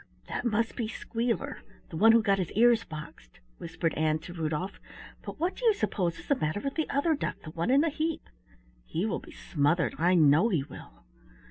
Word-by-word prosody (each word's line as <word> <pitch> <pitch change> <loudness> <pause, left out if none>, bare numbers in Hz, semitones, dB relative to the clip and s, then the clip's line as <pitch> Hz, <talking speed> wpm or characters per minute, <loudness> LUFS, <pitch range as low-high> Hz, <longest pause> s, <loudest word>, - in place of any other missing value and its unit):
"That - - -4
must 230 0 0
be 230 - -2
Squealer, 235 +5 -3 0.3
the - - -8
one 220 +7 +6
who 230 -1 +5
got 200 -2 +2
his 180 - -2
ears 230 +1 +4
boxed," 150 - -10 0.2
whispered 165 0 -2
Ann 155 0 +1
to 175 +2 -9
Rudolf, 165 +3 -3 0.4
"but - - -8
what 350 +4 0
do - - -9
you 445 -3 +5
suppose 180 - -1
is - - -12
the - - +4
matter 155 - -1
with 275 +4 -3
the 315 - -2
other 300 +4 +2
duck, 290 - -3
the 155 - -8
one 165 +7 -2
in 270 +2 +5
the 330 - +2
heap? 315 +2 -3 0.6
He 165 - -2
will 220 - -1
be - - -14
smothered, 165 +1 0
I 175 +3 +4
know 155 +6 +5
he 165 -10 +1
will!" - - -13
195 Hz, 210 wpm, -29 LUFS, 160-240 Hz, 0.6 s, one